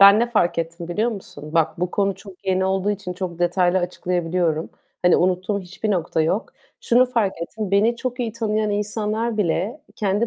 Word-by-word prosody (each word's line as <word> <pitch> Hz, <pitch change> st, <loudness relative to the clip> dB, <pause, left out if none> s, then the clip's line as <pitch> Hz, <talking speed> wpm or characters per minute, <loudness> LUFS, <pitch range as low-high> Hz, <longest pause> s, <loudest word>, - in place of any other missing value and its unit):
Ben 200 Hz, +2 st, +9 dB
ne 240 Hz, 0 st, +1 dB
fark 175 Hz, -7 st, +2 dB
ettim 170 Hz, +1 st, -4 dB
biliyor 215 Hz, +7 st, +1 dB
musun? 175 Hz, -7 st, -9 dB
Bak 160 Hz, 0 st, +2 dB
bu 180 Hz, 0 st, 0 dB
konu 200 Hz, 0 st, +1 dB
çok 195 Hz, 0 st, -14 dB
yeni 190 Hz, 0 st, +2 dB
olduğu 190 Hz, +1 st, +1 dB
için 200 Hz, -3 st, -3 dB
çok 180 Hz, -2 st, -5 dB
detaylı 175 Hz, +1 st, +3 dB
açıklayabiliyorum. 175 Hz, -2 st, -1 dB, 0.3 s
Hani, 180 Hz, -1 st, +6 dB
unuttuğum 185 Hz, +3 st, +1 dB
hiçbir 190 Hz, +4 st, -4 dB
nokta 170 Hz, -4 st, 0 dB
yok. 190 Hz, +8 st, -1 dB, 0.3 s
Şunu 245 Hz, +2 st, +4 dB
fark 230 Hz, -6 st, +1 dB
ettim. 210 Hz, +3 st, -4 dB
Beni 215 Hz, +4 st, +3 dB
çok 250 Hz, +1 st, -3 dB
iyi 230 Hz, -2 st, -1 dB
tanıyan 215 Hz, -2 st, 0 dB
insanlar 215 Hz, +2 st, -1 dB
bile 210 Hz, -, 0 dB, 0.2 s
kendi 205 Hz, +2 st, +1 dB
195 Hz, 180 wpm, -22 LUFS, 175-215 Hz, 0.3 s, Ben